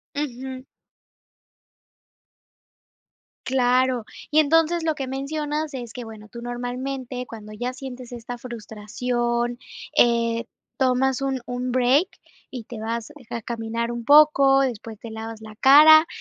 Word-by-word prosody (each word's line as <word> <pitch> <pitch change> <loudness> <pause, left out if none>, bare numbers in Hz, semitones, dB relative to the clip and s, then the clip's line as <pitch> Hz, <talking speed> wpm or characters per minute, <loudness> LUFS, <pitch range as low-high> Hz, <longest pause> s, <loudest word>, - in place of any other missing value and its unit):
Ujú. 260 -2 -5 2.8
Claro, 255 -2 +2 0.3
y 310 - +5
entonces, 325 +2 +3
lo 315 -2 0
que 270 -2 -4
mencionas 295 +2 -3
es 240 -2 -7
que, 245 - -6
bueno, 215 -1 -11
tú 235 -1 -9
normalmente, 250 +1 -4
cuando 215 -2 -10
ya 245 +4 -3
sientes 255 -2 -9
esta 240 0 -7
frustración, 240 +1 -3 0.4
eh, 235 -1 +3 0.3
tomas 265 0 +2
un 270 -1 -1
un 250 0 -3
break 255 +8 +3 0.4
y 250 -4 -7
te 225 0 -9
vas 230 +4 -4 0.2
a 230 - -4
caminar 230 0 -3
un 235 -1 -5
poco, 275 -1 +6
después 230 -4 -3
te 230 - -9
lavas 220 0 -7
la 215 -1 -11
cara, 310 +4 +8
250 Hz, 125 wpm, -23 LUFS, 235-270 Hz, 2.8 s, cara